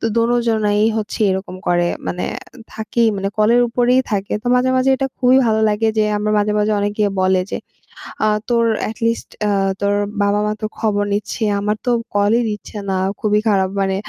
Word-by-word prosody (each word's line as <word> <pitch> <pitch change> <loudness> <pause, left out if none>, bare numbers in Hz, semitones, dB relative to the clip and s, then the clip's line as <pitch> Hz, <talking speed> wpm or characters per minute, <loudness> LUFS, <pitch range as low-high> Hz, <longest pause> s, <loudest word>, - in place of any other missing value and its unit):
তো - - -6
দোনোজনেই 230 -3 +1 0.2
হচ্ছে 215 +1 -5
এরকম 190 -1 -4
করে 175 0 +2 0.2
মানে 180 - -3 0.5
থাকি 220 +2 -2
মানে 195 0 -2
কলের 230 +3 +4
উপরেই 245 +2 +2
থাকে। 200 -1 -2
তো - - -10
মাঝে, 250 +1 +2
মাঝে 260 +1 +2
এটা 270 - -1
খুবই 255 0 +4
ভালো 220 0 +2
লাগে 210 +1 0
যে - - +4
আমার 210 +1 -1
মাঝে, 210 0 +1
মাঝে 210 +1 +1
অনেকে 205 +1 0 0.2
বলে, 185 0 +3
যে - - -3 0.7
আ - - +3 0.2
"তোর 235 -1 +2 0.2
এটি 220 - -8
লিস্ট 230 0 -2 0.2
আ - - +1 0.3
তোর 200 0 +1 0.3
বাবা-মা 205 +1 +1
তো - - -1
খবর 205 -2 +1
নিচ্ছে। 210 +3 -3 0.2
আমার 210 +1 0
তো 245 - +2 0.2
কলই 205 +3 +3
দিচ্ছে 210 +1 -7
না। - - 0 0.3
খুবই 210 -1 +2
খারাপ 190 -2 +2
মানে 190 0 0
210 Hz, 185 wpm, -18 LUFS, 205-230 Hz, 0.7 s, কলের